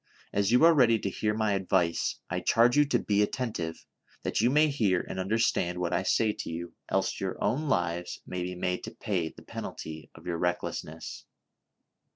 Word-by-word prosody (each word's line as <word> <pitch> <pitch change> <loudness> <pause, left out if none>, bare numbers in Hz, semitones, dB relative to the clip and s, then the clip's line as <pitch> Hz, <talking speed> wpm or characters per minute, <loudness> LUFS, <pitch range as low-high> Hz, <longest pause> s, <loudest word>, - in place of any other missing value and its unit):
As 100 +1 +2
you 125 +5 +5
are 170 - +8
ready 120 -6 +5
to 100 -2 -3
hear 105 +2 -1
my 110 -2 +1
advice, 95 -3 +1
I 90 - -2
charge 115 +7 +4
you 150 0 +6
to 145 - +2
be 105 -1 +1
attentive, 105 -8 -2 0.4
that - - 0
you 120 - +4
may 150 +3 +5
hear 105 -11 +2
and 95 - -5
understand 95 -3 +1
what 90 -1 -1
I 85 - +2
say 110 +3 +2
to - - -6
you, 85 +1 -5 0.2
else - - 0
your - - -3
own 140 +9 0
lives 85 -5 -1
may 90 -1 -4
be 90 +1 -3
made 90 0 -2
to 110 +1 -9
pay 95 -8 -1
the - - -15
penalty 80 -1 -7
of - - -14
your 85 -1 -2
recklessness. 85 -2 -3
95 Hz, 190 wpm, -29 LUFS, 90-115 Hz, 0.4 s, are